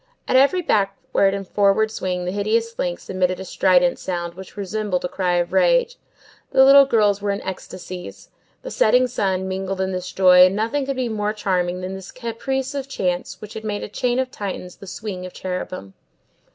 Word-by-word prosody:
At - - +1
every 280 +8 +4
backward 195 -3 +1
and 195 -1 -6
forward 205 +2 +2
swing 180 -4 -3
the 180 - -2
hideous 225 +3 -1
links 175 -1 -3
emitted 185 -1 0
a 190 - -6
strident 180 -1 +3
sound, 175 -2 -4
which 190 +3 -12
resembled 200 -2 -2
a - - +1
cry 180 -1 -1
of 175 0 -1
rage; - - +3 0.5
the 265 - +5
little 275 0 +8
girls 205 -5 +2
were 205 - -2
in 200 0 -1
ecstasies; 185 -1 -8 0.3
the - - -6
setting 255 - +4
sun 190 -6 -1
mingled 190 0 -3
in 190 0 -1
this 185 -1 -4
joy, 180 -1 +7
and 185 - -2
nothing 230 +6 -1
could 275 - -1
be 255 -1 -1
more 210 -2 -2
charming 180 -3 -1
than 185 +1 -5
this 190 0 -8
caprice 260 +3 -3
of 275 -1 -4
chance 180 -8 -2
which 210 0 -9
had 220 - -7
made 210 -1 -3
of - - -7
a - - -35
chain 245 -1 0
of 260 -1 -1
Titans 185 -3 -6
the 195 - -12
swing 190 -2 -6
of 185 - -8
cherubim. 180 - -5
195 Hz, 200 wpm, -21 LUFS, 185-230 Hz, 0.5 s, little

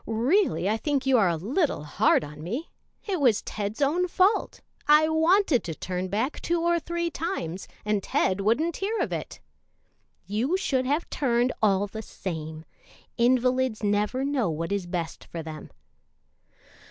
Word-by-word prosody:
"Really 230 - +2
I 215 +2 +1
think 280 +1 -1
you 265 -2 +4
are 195 -4 +4
a 170 - 0
little 235 - -1
hard 150 - +2
on 150 +1 -9
me. 240 - -4 0.3
It 385 -5 -1
was 235 -6 +3
Ted's 210 +6 -3
own 345 +6 +2
fault. 375 +4 +2 0.3
I 300 +1 +6
wanted 320 - +3
to 165 -3 -4
turn 180 +2 -3
back 220 +9 -2
two 345 0 0
or 340 0 +2
three 340 +1 -3
times, 195 - -4 0.2
and 210 -1 +1
Ted 190 0 0
wouldn't 285 +12 +1
hear 420 +4 -2
of - - -1
it." - - -6 0.8
"You 235 - 0
should 260 -8 0
have 295 +5 0
turned, 245 -2 +1
all 200 -2 +3
the 220 +2 -7
same. 160 -6 -6 0.5
Invalids 250 -1 +2
never 210 +6 +1
know 275 -8 0
what 165 +3 -3
is 200 -3 -1
best 175 -2 -4
for 165 -1 -7
them." 155 -1 -8
235 Hz, 160 wpm, -26 LUFS, 190-310 Hz, 0.8 s, I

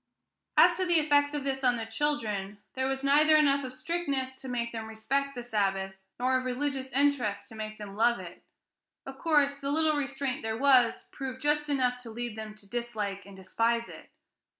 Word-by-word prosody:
As - - +7
to 370 - +1
the 345 -1 +4
effects 290 -1 +3
of 290 - -2
this 270 -1 -2
on 245 -1 +3
the 225 - -4
children, 225 -6 -2 0.2
there 260 0 -1
was 270 0 -2
neither 300 +3 +5
enough 280 -2 +4
of 255 0 -7
strictness 275 -5 -2
to 265 - -8
make 235 -1 -2
them 225 -1 -5
respect 275 +6 -2
the 245 - -5
Sabbath, 195 -4 -1 0.3
nor 255 +1 +2
of 255 - -7
religious 265 +1 -2
interest 260 -7 +1
to 220 - -11
make 215 0 -6
them 205 -2 -8
love 235 +2 +3
it; - - -10 0.6
of 270 0 -9
course, 290 -4 +3
the 280 0 -4
little 310 +1 +2
restraint 275 -2 -2
there 220 0 -3
was 255 -2 +4
proved 260 -1 -6
just 295 0 +1
enough 250 -3 +1
to 245 -2 -10
lead 235 0 -5
them 215 -1 -7
to 210 -2 -14
dislike 210 -4 -4
and 200 - -12
despise 230 +5 0
it. - - -12
255 Hz, 195 wpm, -29 LUFS, 225-280 Hz, 0.6 s, As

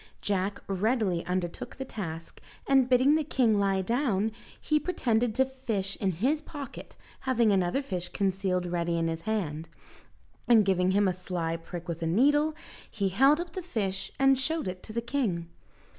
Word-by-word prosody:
Jack 200 0 -1
readily 195 -2 0
undertook 180 -1 -3
the 265 - -5
task, 165 -9 -7 0.2
and 270 -2 +4
bidding 260 +3 +5
the 310 0 +2
king 240 -7 +2
lie 195 -1 +1
down, 225 -2 +1 0.3
he 305 0 +1
pretended 245 -9 0
to 265 - +4
fish 225 -7 -3
in 190 -3 +1
his 265 - +1
pocket, 290 -4 -9 0.2
having 240 -4 +2
another 190 +7 +1
fish 180 -8 -4
concealed 190 -2 0
ready 170 -1 -1
in 165 0 +1
his 165 0 -3
hand, 165 -7 -2 0.8
and 225 -4 +6
giving 185 -1 +2
him 200 +1 +3
a 185 - +1
sly 175 -2 -3
prick 170 +1 -8
with 170 -1 -4
a 165 - 0
needle, 290 - +3 0.3
he 200 -3 -1
held 270 - +4
up 345 -1 -5
the 370 - -4
fish, 205 - -3
and 270 -1 +4
showed 315 -2 -1
it 180 0 -5
to - - -8
the 235 +2 -2
king. 225 -10 -2
205 Hz, 175 wpm, -28 LUFS, 180-265 Hz, 0.8 s, and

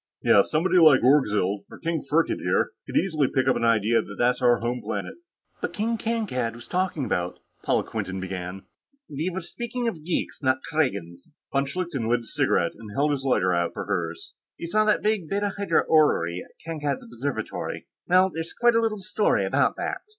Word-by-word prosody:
Yes, 100 - +5
somebody 180 +4 +3
like 155 -7 +7
Orgzild, 105 -7 +2
or - - -11
King 165 -2 -2
Firkked 150 +5 +1
here, - - +1 0.2
could - - -2
easily 155 -7 +2
pick 130 0 0
up 130 - +5
the - - -2
idea 115 0 +3
that - - -9
that's 125 +1 +2
our 120 -1 +5
home 120 +1 -2
planet." - - -4 0.5
"But - - -3
King 225 +2 0
Kankad 215 - -2
was 120 - -11
talking 180 -6 -1
about...." 90 -5 -2 0.3
Paula - - +1
Quinton 95 -3 -4
began. 95 0 -5 0.4
"We 155 +5 -3
were 185 0 -5
speaking 240 +6 -4
of 170 -9 -4
geeks, 170 -1 -2
not 130 -1 +1
Kragans." 100 - -2 0.2
Von 140 0 +1
Schlichten 145 -7 -3
lit 120 0 +2
his 115 - -10
cigarette 85 - +1
and 110 -2 -11
held 145 +2 +2
his 140 -2 -2
lighter 95 -9 +2 0.2
for - - -4
hers. 85 -1 -3 0.2
"You - - -6
saw 215 +5 +2
that 210 - +2
big 210 -7 0
Beta 200 0 -1
Hydrae 200 0 +1
orrery 90 - +3
at - - -22
Kankad's 150 -4 -3
observatory. 120 -1 -4 0.2
Well, 185 +1 +4
there's 165 0 -5
quite 240 0 +4
a 230 - +3
little 215 -3 -1
story 205 +2 +1
about - - +2
that. - - -3
145 Hz, 190 wpm, -25 LUFS, 115-180 Hz, 0.5 s, like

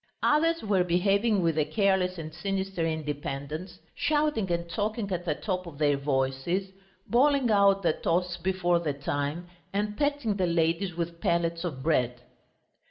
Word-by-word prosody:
Others 330 +3 +3
were 200 -4 +2
behaving 195 +4 +2
with 165 -2 +1
a - - +4
careless 190 -2 +1
and 155 -1 -7
sinister 195 0 -2
independence, 150 +2 -4 0.2
shouting 295 - +1
and 170 0 -1
talking 210 +3 -2
at 175 -1 -2
the 155 - 0
top 185 -1 -3
of 155 -4 -10
their 145 -1 +3
voices, 140 +7 -1 0.3
bawling 265 0 +3
out 200 -1 +4
the 170 - +3
toasts 175 +2 -1
before 175 -1 +1
the 155 -4 -2
time, 145 +4 -3 0.2
and 210 +1 -1
pelting 285 -7 0
the 185 -2 +1
ladies 170 +2 +1
with 170 0 -4
pellets 170 0 0
of 140 -7 -4
bread. 125 -6 +1
175 Hz, 155 wpm, -28 LUFS, 160-200 Hz, 0.3 s, a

